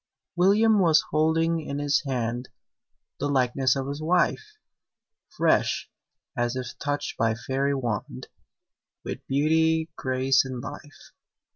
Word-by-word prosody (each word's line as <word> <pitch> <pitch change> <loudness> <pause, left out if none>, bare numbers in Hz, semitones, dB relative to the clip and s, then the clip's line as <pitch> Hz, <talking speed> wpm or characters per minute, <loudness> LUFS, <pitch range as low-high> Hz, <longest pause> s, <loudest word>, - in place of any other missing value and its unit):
William 205 +4 +4
was 165 -4 +4
holding 165 +2 +2
in 140 -2 -5
his 145 0 +1
hand 120 -1 -2 0.7
The 145 - -1
likeness 130 0 +2
of 135 -1 -3
his 140 +2 -5
wife! 180 - 0 0.7
Fresh, - - +1 0.4
as 120 -1 -1
if 130 -1 -5
touched 145 0 -3
by 115 -1 +2
fairy 135 +4 -1
wand, 110 - -4 0.8
With - - -6
beauty, 160 +3 +2
grace, 130 0 +2
and 130 -2 -6
life. 145 +3 -10
140 Hz, 120 wpm, -26 LUFS, 130-160 Hz, 0.8 s, William